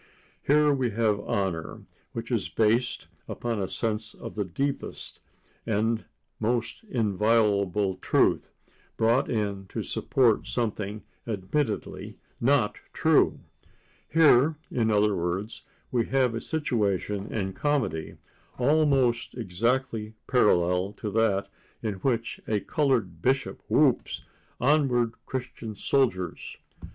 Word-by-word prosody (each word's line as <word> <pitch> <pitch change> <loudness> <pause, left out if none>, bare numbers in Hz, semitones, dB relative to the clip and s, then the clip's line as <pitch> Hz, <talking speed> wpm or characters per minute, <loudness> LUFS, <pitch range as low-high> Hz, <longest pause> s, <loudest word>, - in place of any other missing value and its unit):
Here 150 +1 +4
we 130 -3 0
have 110 -1 +1
honor, 95 -5 -2 0.3
which - - -5
is - - 0
based 120 +2 +1 0.2
upon 115 -3 -3
a 95 - -1
sense 110 +1 -2
of - - -8
the 105 - -1
deepest 135 +8 -4 0.4
and 110 +1 0 0.3
most 115 - -1
inviolable 105 - +1
truth, - - +2 0.5
brought 115 +5 +3
in 100 -4 -2
to - - -4
support 120 -5 +1
something 110 -3 -3 0.2
admittedly 110 +4 -2 0.2
not 130 -4 +2 0.2
true. - - +3 0.7
Here, 155 -2 +5 0.2
in 115 -2 +1
other 105 -1 +3
words, 90 +5 -3 0.3
we 120 -3 +1
have 130 -2 +2
a 115 - -3
situation 105 - -1
in 95 -3 -2
comedy, 130 - -1 0.4
almost 135 -3 +2
exactly 115 +1 -1
parallel 90 -5 +2
to 105 - -5
that 105 -2 +2 0.4
in 110 -2 -1
which 115 -3 -1
a 105 -2 0
colored 115 - 0
bishop 135 +4 0
whoops - - +2 0.4
"Onward, 125 -4 +2
Christian 120 -4 -5
Soldiers!" 100 -7 -1
115 Hz, 110 wpm, -27 LUFS, 100-125 Hz, 0.7 s, Here